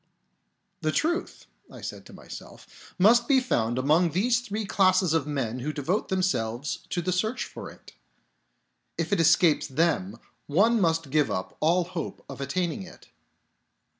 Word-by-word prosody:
" 195 -2 -49
The 155 -1 0
truth," 335 - -1 0.3
I - - -11
said - - -7
to - - -14
myself, - - -11 0.3
" - - -42
must 235 +1 +5
be 275 -2 +5
found 120 - 0
among 155 +7 +3
these 225 +9 +2
three 220 -3 -4
classes 185 -3 +3
of 160 -3 +1
men 130 -5 -2
who 145 +5 -3
devote 155 +8 -1
themselves 145 - -1
to 175 - -2
the 185 - -1
search 215 +7 -1
for - - -9
it. - - -16 1.0
If 170 +4 -1
it 200 - +2
escapes 165 0 +4
them, 130 - 0 0.3
one 210 +9 +3
must 165 -4 0
give 150 -1 +2
up 95 - -4
all 170 +3 +3
hope 175 -1 -6
of - - -8
attaining 170 +7 -2
it. 185 -1 -13
170 Hz, 165 wpm, -26 LUFS, 145-195 Hz, 1.0 s, must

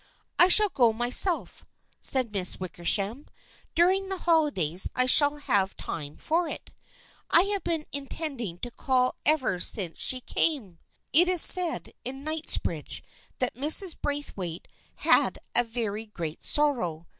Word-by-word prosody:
" - - -47
I 355 - +7
shall 420 +3 +7
go 240 -9 +1
myself," 245 - +2 0.4
said 255 -4 +2
Miss 190 -3 -1
Wickersham. 195 - -4 0.2
" - - -30
During 380 +3 +1
the 385 - -4
holidays 290 - +1
I 255 - +2
shall 290 +3 +6
have 200 -9 -2
time 145 -1 -8
for 335 +2 -2
it. - - -10 0.6
I 340 - +5
have 400 - -4
been 325 -3 -4
intending 275 - -7
to 245 - -10
call 255 0 -1
ever 285 - 0
since 180 -3 -1
she 255 - +2
came. 240 - -3 0.3
It 345 +5 +6
is 360 -3 +6
said 360 -3 +2
in 270 +3 -6
Kingsbridge 315 0 -4 0.3
that 255 - -1
Mrs. 310 - +4
Braithwaite 200 - -5 0.3
had - - +1 0.2
a 240 - +4
very 225 -2 -6
great 165 -7 -8
sorrow. 230 - -1
260 Hz, 145 wpm, -25 LUFS, 200-315 Hz, 0.6 s, I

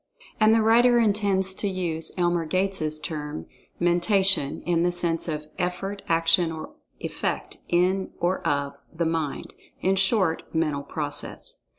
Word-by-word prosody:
And, 215 0 +5
the 225 0 +4
writer 240 +2 +5
intends 200 -4 +2
to 205 - -3
use 170 -4 -2
Elmer 175 -2 +1
Gates' 185 -4 -1
term, 150 - -5 0.3
"Mentation," 175 -2 +3
in 170 -1 +1
the 175 +1 +2
sense 175 -1 +1
of 155 -2 -3
"effort; 195 +3 -3
action; 165 +1 +3
or 160 -1 -8 0.3
effect; - - -4
in 185 +2 +1
or 180 +2 0
of, 140 -1 -1
the 170 0 -2
Mind"—in 165 +4 -3
short, 190 -4 +2
"mental 155 -3 0
process." 145 0 -4
175 Hz, 130 wpm, -25 LUFS, 160-190 Hz, 0.3 s, And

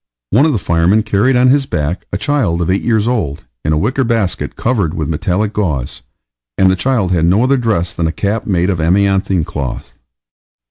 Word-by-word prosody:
One 135 +10 +4
of - - +1
the 125 - 0
firemen 90 +4 +2
carried 110 +5 +1
on 125 +1 +4
his 140 -1 +2
back 75 +2 -3
a - - -1
child 95 - 0
eight 95 - 0
years 110 -2 +1
old, 100 - -2 0.2
in 75 - 0
a 75 - +2
wicker 125 - 0
basket 115 -6 -1
covered 100 -9 -1
with 75 - -2
metallic 90 +7 -1
gauze, 75 - -2 0.6
and 95 -1 +4
the - - +2
child 110 -3 0
had 85 -2 +2
no 95 +7 +3
other 135 +2 +3
dress 110 -9 -1
than 85 - -1
a - - -1
cap 105 +5 -2
made 90 -1 +1
of 90 - -2
amianthine 95 +1 +1
cloth. 70 -4 -5
95 Hz, 195 wpm, -15 LUFS, 85-115 Hz, 0.6 s, One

